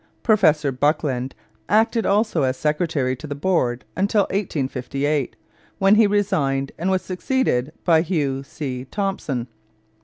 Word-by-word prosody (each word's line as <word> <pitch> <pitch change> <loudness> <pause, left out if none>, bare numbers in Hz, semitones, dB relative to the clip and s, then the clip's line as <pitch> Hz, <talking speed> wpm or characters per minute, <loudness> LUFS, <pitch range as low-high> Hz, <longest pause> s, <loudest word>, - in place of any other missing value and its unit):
Professor 155 - +3
Buckland 135 -1 0 0.3
acted 225 +1 +2
also 205 -4 +2
as 130 -1 0
secretary 150 -4 0
to 150 +5 -9
the 145 - -4
board 140 - 0
until 200 +1 +2
1858, 145 - -2 0.4
when 195 +1 +4
he 215 0 +6
resigned 175 -10 0
and 180 +3 0
was 190 -1 +1
succeeded 185 - -1
by 165 -2 +5
Hugh 150 -6 -1
C. 130 -2 -6
Thomson. 150 - -3
155 Hz, 125 wpm, -22 LUFS, 135-195 Hz, 0.4 s, he